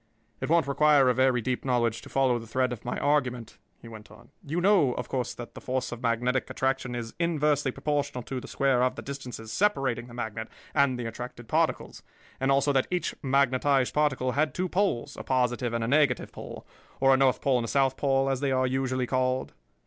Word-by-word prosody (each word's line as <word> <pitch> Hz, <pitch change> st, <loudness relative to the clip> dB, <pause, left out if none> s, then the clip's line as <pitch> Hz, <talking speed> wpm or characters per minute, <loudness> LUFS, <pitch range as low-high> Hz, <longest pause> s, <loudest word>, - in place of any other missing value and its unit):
"It -, -, -4 dB
won't 165 Hz, -2 st, +4 dB
require 140 Hz, -1 st, +4 dB
a -, -, +4 dB
very 130 Hz, -1 st, +2 dB
deep 125 Hz, +2 st, -2 dB
knowledge 120 Hz, -3 st, 0 dB
to -, -, -12 dB
follow 130 Hz, -3 st, +2 dB
the 115 Hz, -, -10 dB
thread 125 Hz, +2 st, 0 dB
of 120 Hz, -, -9 dB
my 125 Hz, -, -3 dB
argument," 125 Hz, -6 st, -1 dB, 0.2 s
he -, -, -10 dB
went 110 Hz, -2 st, -11 dB
on. -, -, -17 dB
"You 155 Hz, +4 st, -2 dB
know, 175 Hz, -9 st, +4 dB
of 125 Hz, -, -5 dB
course, 125 Hz, -2 st, -3 dB
that 120 Hz, -, -9 dB
the -, -, -10 dB
force 130 Hz, 0 st, -2 dB
of 120 Hz, 0 st, -7 dB
magnetic 125 Hz, +2 st, 0 dB
attraction 130 Hz, -2 st, -1 dB
is 115 Hz, -1 st, -5 dB
inversely 150 Hz, -4 st, +1 dB
proportional 140 Hz, -2 st, -2 dB
to 130 Hz, +1 st, -4 dB
the -, -, -10 dB
square 135 Hz, -3 st, +1 dB
of 130 Hz, 0 st, +1 dB
the -, -, -7 dB
distances 125 Hz, -5 st, -7 dB
separating 135 Hz, -, 0 dB
the 120 Hz, -, -12 dB
magnet 110 Hz, -2 st, -4 dB, 0.3 s
and 140 Hz, -3 st, +3 dB
the 120 Hz, -, -4 dB
attracted 120 Hz, +1 st, -7 dB
particles, -, -, -1 dB, 0.4 s
and 135 Hz, +1 st, +1 dB
also 140 Hz, +1 st, +3 dB
that 130 Hz, -1 st, +2 dB
each 180 Hz, -1 st, -1 dB
magnetized 135 Hz, -1 st, +2 dB
particle 135 Hz, -4 st, +1 dB
had 150 Hz, +3 st, 0 dB
two 185 Hz, +1 st, -1 dB
poles, 175 Hz, -8 st, -1 dB
a -, -, -6 dB
positive 125 Hz, -1 st, 0 dB
and 115 Hz, -1 st, -1 dB
a -, -, -1 dB
negative 140 Hz, -1 st, +2 dB
pole, -, -, -9 dB, 0.3 s
or 135 Hz, 0 st, +5 dB
a -, -, +4 dB
north 130 Hz, -1 st, +3 dB
pole 130 Hz, -3 st, +2 dB
and 115 Hz, -, -2 dB
a -, -, -5 dB
south 135 Hz, +1 st, +2 dB
pole, 135 Hz, -1 st, +1 dB
as 135 Hz, -1 st, 0 dB
they 140 Hz, -1 st, 0 dB
are 130 Hz, 0 st, +2 dB
usually 130 Hz, 0 st, -1 dB
called?" 130 Hz, +1 st, -1 dB
130 Hz, 215 wpm, -27 LUFS, 125-140 Hz, 0.4 s, or